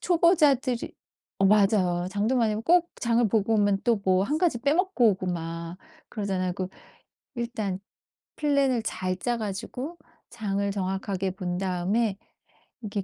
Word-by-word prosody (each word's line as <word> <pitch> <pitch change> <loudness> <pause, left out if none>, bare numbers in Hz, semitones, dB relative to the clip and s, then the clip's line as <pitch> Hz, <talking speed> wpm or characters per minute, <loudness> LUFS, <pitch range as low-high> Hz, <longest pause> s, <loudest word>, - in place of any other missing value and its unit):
초보자들이 300 -8 +3 0.5
어 195 - +4
맞아요. 195 -4 +3
장도 210 +6 0
많이 225 -3 +2
보고 330 +12 +4
꼭 345 - -34
장을 235 0 +2
보고 220 +1 +1
오면 205 -2 +2
또 235 -1 +3
뭐 185 0 +3
1 295 +9 -1
가지 335 -9 +1
빼먹고 285 - +3
오고 190 -1 -3
막 170 0 -4 0.3
그러잖아요. 190 -4 -2
그 185 -1 -3 0.7
일단 225 -6 -3 0.6
플랜을 280 -5 +2
잘 185 -3 -2
짜 240 +5 -1
가지고 230 - -5 0.3
장을 200 -3 -2
정확하게 190 -1 -2
본 180 -2 -4
다음에 190 +3 0 0.6
이렇게 205 -2 -3
210 Hz, 280 characters per minute, -26 LUFS, 190-245 Hz, 0.7 s, 어